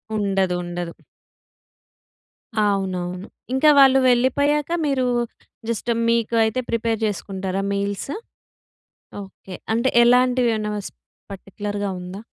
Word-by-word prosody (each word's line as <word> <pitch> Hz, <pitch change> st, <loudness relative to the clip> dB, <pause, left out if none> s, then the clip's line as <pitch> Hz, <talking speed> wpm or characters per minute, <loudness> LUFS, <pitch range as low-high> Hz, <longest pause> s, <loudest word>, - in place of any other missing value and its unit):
ఉండదు. 195 Hz, -3 st, 0 dB
ఉండదు. 175 Hz, -1 st, -5 dB, 1.7 s
అవునవును. 185 Hz, -2 st, -1 dB, 0.3 s
ఇంకా 285 Hz, +4 st, +4 dB
వాళ్ళు 270 Hz, -1 st, +7 dB
వెళ్ళిపోయాక 285 Hz, +5 st, +2 dB, 0.2 s
మీరు, 265 Hz, -3 st, +1 dB, 0.6 s
జస్ట్ 235 Hz, +1 st, -2 dB, 0.2 s
మీకు 230 Hz, 0 st, +1 dB
అయితే 220 Hz, +3 st, 0 dB
ప్రిపేర్ 230 Hz, -1 st, -1 dB
చేసుకుంటారా 195 Hz, -2 st, -3 dB
మీల్సా? 200 Hz, -, -3 dB, 1.1 s
ఓకె. 190 Hz, -1 st, -11 dB, 0.2 s
అంటే, 235 Hz, +3 st, +2 dB
ఎలాంటివి 250 Hz, 0 st, +4 dB
ఏమైనా 210 Hz, -1 st, -3 dB, 0.2 s
స్ -, -, -11 dB, 0.4 s
పర్టిక్యులర్‌గా 205 Hz, +1 st, -5 dB
ఉందా? 180 Hz, +3 st, -8 dB
210 Hz, 95 wpm, -22 LUFS, 195-245 Hz, 1.7 s, వాళ్ళు